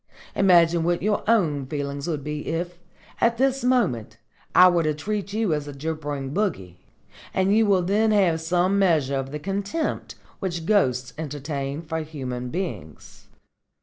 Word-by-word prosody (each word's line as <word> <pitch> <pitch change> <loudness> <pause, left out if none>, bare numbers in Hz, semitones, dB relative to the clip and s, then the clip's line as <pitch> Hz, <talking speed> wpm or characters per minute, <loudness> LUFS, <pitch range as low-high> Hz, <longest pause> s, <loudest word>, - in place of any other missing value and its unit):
Imagine 170 -3 +4
what 175 +1 0
your 210 0 +1
own 155 - +2
feelings 140 +1 -4
would 150 -5 -2
be 150 0 -5
if, 175 +1 -3 0.4
at 230 0 +3
this 270 +1 +1
moment, 165 - +1 0.4
I 180 +1 +9
were 175 -2 +3
to 155 -2 0
treat 200 +6 -3
you 215 -4 0
as 150 -1 -3
a 145 - -6
gibbering 145 -2 -4
bogey, 95 - -2 0.6
and 190 +2 +3
you 220 -1 +4
will 190 -3 +3
then 210 +5 +2
have 185 -6 +3
some 180 +4 +1
measure 155 -8 +2
of 135 0 -3
the 150 - -3
contempt 195 - -3 0.2
which 170 -4 -3
ghosts 130 - +1
entertain 145 0 -4
for 160 0 -3
human 130 -5 -5
beings." 140 - -6
165 Hz, 155 wpm, -24 LUFS, 145-195 Hz, 0.6 s, I